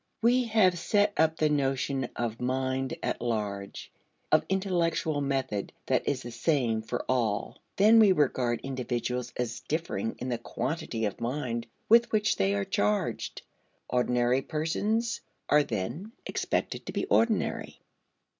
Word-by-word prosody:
We 245 +2 +4
have 205 -6 +3
set 205 +3 +2
up 160 0 +2
the 155 - +2
notion 135 -2 0
of 115 -1 -3
mind 130 +1 -1
at - - -2
large, 105 -4 -3 0.4
of - - +5
intellectual 175 -5 0
method 135 -7 -2
that - - +1
is 130 -2 -2
the 120 - -7
same 120 -3 +1
for 110 - -4
all. 115 -5 0 0.2
Then 215 +3 +6
we 210 -3 +7
regard 130 -7 +1
individuals 125 -2 -3
as 115 -2 -2
differing 170 +9 -2
in 125 - -4
the 120 -2 -1
quantity 115 -3 -3
of 105 - -4
mind 120 -1 -2 0.2
with 235 +1 +5
which 210 -1 +2
they 95 +1 +2
are 100 0 -1
charged. 105 +1 -1 0.5
Ordinary 125 +1 +2
persons 210 - -1 0.3
are 150 - +6
then 145 - -4
expected - - -2
to - - -3
be - - -1
ordinary. 230 -2 +1
135 Hz, 140 wpm, -29 LUFS, 120-175 Hz, 0.5 s, we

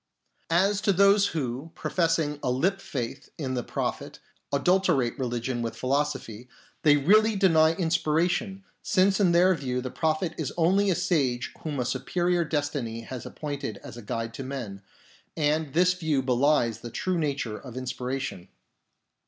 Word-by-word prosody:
As 195 +4 +2
to 200 - +3
those 200 +1 +5
who, 135 0 -4
professing 165 -5 0
a - - -1
lip 185 +11 +1
faith 120 -9 -5
in 135 -4 -3
the 125 - -1
Prophet, - - -4 0.3
adulterate 145 -4 +2
religion 120 -1 -2
with 115 -1 -3
philosophy, 130 -4 -2 0.3
they 150 -1 +5
really 215 +9 +4
deny 165 -5 +4
inspiration, 175 +4 0 0.2
since 190 0 +2
in 190 -4 +4
their 180 +2 +5
view 130 -6 -2
the 125 0 -5
Prophet 160 +1 -1
is - - -2
only 190 +4 +3
a 185 - +2
sage 140 -9 0
whom 150 -4 -4
a 125 - 0
superior 175 +8 0
destiny 145 -7 -2
has 125 +1 -7
appointed 140 -8 -5
as - - -9
guide 115 +1 -4
to 135 - -6
men, 120 -8 -6 0.6
and 150 -1 0
this 180 +1 +4
view 160 -6 -1
belies 125 -3 +2
the 120 - -7
true 180 +8 -1
nature 140 -8 -2
of 130 -2 -10
inspiration. 130 -6 -4
150 Hz, 150 wpm, -27 LUFS, 125-175 Hz, 0.6 s, those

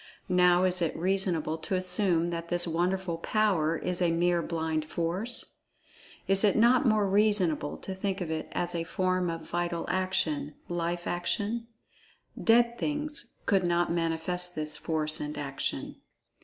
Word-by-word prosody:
Now 180 0 +4
is 180 -1 +5
it 165 - 0
reasonable 175 -3 0
to 185 +4 -1
suppose 180 -2 +2
that 170 0 -5
this 175 0 +2
wonderful 175 +1 -1
"power" 170 -6 +1
is 180 0 -2
a 175 - +3
mere 175 +1 +2
blind 160 -2 -2
force? 170 +9 -3 0.7
Is 195 +1 +4
it 205 - +4
not 240 +3 +4
more 215 -2 +3
reasonable 190 -7 +1
to 190 - -6
think 190 +1 -3
of 175 -4 -4
it 160 - -3
as 175 0 -2
a 170 -1 -2
form 185 +1 0
of 165 -1 -5
vital 175 -1 -2
action—life 175 -1 -2
action? 210 +6 -2 0.8
"Dead" 235 +1 +4
things 300 +2 -3
could 195 -2 +2
not 175 0 +1
manifest 170 +2 -1
this 155 0 -1
force 155 0 -1
and 150 +1 -5
action. 135 -1 -3
175 Hz, 145 wpm, -29 LUFS, 165-190 Hz, 0.8 s, is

